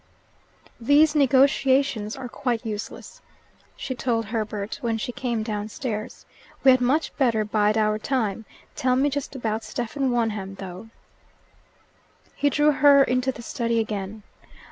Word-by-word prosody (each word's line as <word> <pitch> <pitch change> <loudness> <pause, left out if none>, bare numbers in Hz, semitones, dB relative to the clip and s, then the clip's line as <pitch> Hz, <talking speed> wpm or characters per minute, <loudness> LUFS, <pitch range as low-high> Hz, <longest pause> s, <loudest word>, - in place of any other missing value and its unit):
"These 290 +6 +4
negotiations 270 -5 +3
are 250 - -6
quite 240 -1 -3
useless," 220 - -7 0.5
she 260 - -5
told 235 -2 -1
Herbert 215 -1 -4
when 230 -2 -1
she 225 - -4
came 235 -3 -2
downstairs. 215 +1 -5 0.4
"We 270 - +8
had 255 -1 +3
much 275 +6 +1
better 230 -6 +2
bide 210 0 +1
our 215 -1 +1
time. 225 -3 -2 0.3
Tell 255 -1 +1
me 280 +3 +2
just 280 0 -4
about 225 -3 -2
Stephen 260 +3 -2
Wonham, 215 -5 -1
though." 190 +3 -9 1.5
He 290 - +2
drew 295 +1 +3
her 280 -1 +6
into 255 0 0
the 235 - -11
study 230 0 -1
again. 210 -1 -4
235 Hz, 135 wpm, -24 LUFS, 215-265 Hz, 1.5 s, We